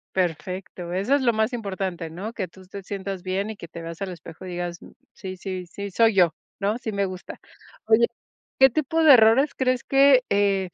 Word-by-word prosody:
Perfecto. 180 0 -3
Eso 200 +9 +2
es 285 - +1
lo 240 -3 +3
más 220 +3 0
importante, 190 -6 -4
¿no? 200 +8 -6
Que 190 -5 -3
tú 190 +3 -16
te 195 +2 -8
sientas 195 -1 -5
bien 195 +3 -2
y 220 - -5
que 170 - -9
te 170 +1 -9
veas 165 +1 -8
al 195 -2 -3
espejo 165 +1 -11
y - - -7
digas: 175 -1 -4 0.3
"Sí, 185 -2 -8
sí, 185 -1 -5
sí, 200 +3 -7
soy 225 +2 +3
yo", 175 -4 +4 0.3
¿no? 205 +3 0
"Sí, 230 -3 -5
me 200 -1 0
gusta". 185 -1 -8 0.5
Oye, 225 +2 +4 0.5
¿qué 265 0 +8
tipo 310 +4 0
de 305 -3 +9
errores 245 +5 +5
crees 255 -1 0
que, 270 -1 +5
eh, 195 -2 +1
195 Hz, 205 wpm, -24 LUFS, 180-230 Hz, 0.5 s, de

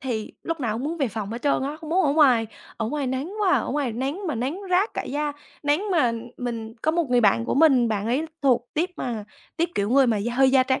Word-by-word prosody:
thì 230 -5 -4
lúc 330 -2 -3
nào 225 -4 -1
cũng 240 +5 -4
muốn 330 +3 -2
về 275 - +1
phòng 210 -2 -5
hết 240 - -6
trơn 285 -2 +2
á, 290 +3 -3
không 320 -1 -8
muốn 370 +1 +3
ở 280 - +3
ngoài. 255 -7 +4 0.3
Ở 225 - -2
ngoài 290 0 -2
nắng 265 +8 -3
quá 390 - +3
à, - - +5
ở - - -4
ngoài 275 -4 -1
nắng 280 - -3
mà 305 - -1
nắng 270 - -3
rát 380 +5 +2
cả - - -2
da, 295 +1 -2 0.3
nắng 310 +9 +1
mà 250 -9 +3 0.2
mình 230 -2 -5
có 315 - +3
một 330 -5 -1
người 245 -1 +4
bạn 115 - +3
của - - -1
mình, 270 -5 +5
bạn 215 -1 -1
ấy 275 +7 0 0.2
thuộc 245 -3 +2
tuýp 345 +4 0
mà 230 -4 -4 0.3
tuýp 335 0 +1
kiểu 200 +2 0
người 270 0 +5
mà 225 - +2
da 225 +4 -2
hơi 265 0 +5
da 260 -1 +5
trắng 260 0 0
265 Hz, 270 wpm, -24 LUFS, 235-310 Hz, 0.3 s, à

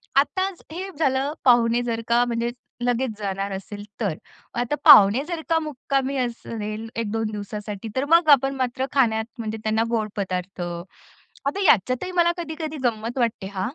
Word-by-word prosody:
आताच 375 +6 +1
हे 375 +4 -5
झालं, 275 0 +1
पाहुणे 240 -1 +5
जर 230 -1 -2
का 240 +1 +3
म्हणजे 235 0 -1 0.3
लगेच 245 +1 0
जाणार 195 0 -3
असेल 205 +2 -7 0.2
तर. 190 -7 0 0.4
आता 245 +4 0
पाहुणे 205 +7 +8
जर 340 -2 -3
का 325 - +4
मुक्कामी 275 -2 -2
असेल 225 -3 -4
1-2 225 -1 -2
दिवसासाठी 210 0 -6
तर 265 +2 0
मग 335 -2 +5
आपण 275 -1 +5
मात्र 260 0 -1
खाण्यात 220 -5 +2
म्हणजे 220 -1 -3
त्यांना 220 +1 +1
गोड 220 -2 0
पदार्थ. 185 -1 -3 0.8
आता 290 +8 -1
याच्यातही 255 - +3
मला 345 -1 +4
कधी-कधी 315 -2 -5
गंमत 230 +1 -1
वाटते 225 -5 -1
हां. 190 - -3
240 Hz, 155 wpm, -23 LUFS, 215-275 Hz, 0.8 s, पाहुणे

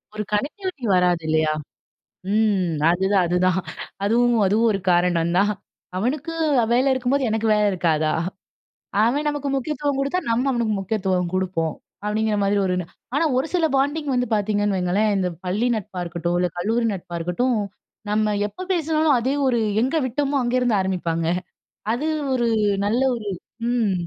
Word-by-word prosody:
ஒரு 210 - -2
கனெக்டிவிட்டி 295 - -3
வராது 180 -2 +2
இல்லையா? 155 0 +2 0.8
ம். 200 -6 +2 0.2
அதுதான், 190 +1 +2
அதுதான். 180 +1 +2 0.5
அதுவும், 240 +3 +3
அதுவும் 220 +4 +3
ஒரு 195 - -1
காரணம் 175 -1 +2
தான். 205 +2 +3 0.5
அவனுக்கு 270 - -2 0.4
வேலை 255 +3 +3
இருக்கும்போது, 260 +1 0
எனக்கு 220 +1 0
வேலை 210 0 +3
இருக்காதா? 160 -4 +1 0.9
அவன் 285 +6 +1
நமக்கு 290 -1 -3
முக்கியத்துவம் 285 +1 -1
குடுத்தா, 275 +6 0
நம்ம 245 +4 +1
அவனுக்கு 230 -3 0
முக்கியத்துவம் 190 -3 -1
குடுப்போம். 180 -4 -1 0.3
அப்டிங்கற 215 +1 0
மாரி 200 +1 +2
ஒண்ணு. 180 -1 -1 0.3
ஆனா 320 - +2
ஒரு 265 - 0
சில 345 -3 +2
பாண்டிங் 285 +2 0
வந்து 250 0 +1
பாத்தீங்கன்னு 205 -1 +1
வையுங்களேன். 190 +4 +1
இந்த 185 - 0 0.2
பள்ளி 210 +7 0
நட்பா 190 -3 -5
இருக்கட்டும், 170 0 -2
இல்ல 180 0 +1
கல்லூரி 230 +5 0
நட்பா 175 -2 -7
இருக்கட்டும். 225 +9 0 0.5
நம்ம 210 0 +1
எப்ப 370 - -8
பேசுனாலும், 315 -4 +2
அதே 260 +4 0
ஒரு 240 -2 +2 0.2
எங்க 265 +6 0
விட்டோமோ 280 +3 -1
அங்க 240 +1 0
இருந்து 235 -5 +2
ஆரம்பிப்பாங்க. 170 -3 -1 0.7
அது 285 +6 -2 0.3
ஒரு, 240 -2 +1 0.4
நல்ல 230 +5 +1
ஒரு 215 -3 -7 0.4
ம். 230 -5 +1
215 Hz, 145 wpm, -22 LUFS, 185-255 Hz, 0.9 s, அதுவும்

